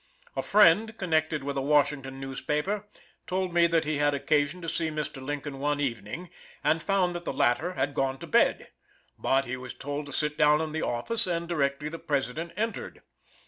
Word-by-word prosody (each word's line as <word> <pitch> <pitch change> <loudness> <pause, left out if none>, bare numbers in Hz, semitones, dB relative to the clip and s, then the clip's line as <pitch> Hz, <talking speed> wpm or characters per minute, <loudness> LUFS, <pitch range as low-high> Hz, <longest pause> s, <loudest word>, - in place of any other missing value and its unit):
A - - 0
friend, 210 +2 +5
connected 155 -4 0
with 140 0 -3
a - - +1
Washington 140 -2 +1
newspaper, 150 +9 -2 0.4
told 185 -1 -1
me 170 0 +5
that 165 -1 +2
he 155 -1 0
had 145 0 +3
occasion 145 +3 +1
to - - -5
see 165 0 -1
Mr. 150 -3 -4
Lincoln 145 0 -4
one 145 +1 0
evening, 135 - -3 0.3
and 160 - +2
found 190 -2 +1
that 175 0 -5
the - - -2
latter 155 +9 +1
had 135 0 -1
gone 135 0 0
to - - -8
bed. - - +2 0.5
But 135 +1 +2
he 130 +1 -4
was 125 -1 -8
told 145 +1 -4
to - - -8
sit 150 +1 -1
down 150 0 +5
in 160 -1 -2
the 160 +1 -2
office, 215 - -1
and 170 -1 -1
directly 150 -3 0
the 165 +2 -6
President 145 +4 -2
entered. 225 +2 -3
150 Hz, 190 wpm, -28 LUFS, 140-170 Hz, 0.5 s, friend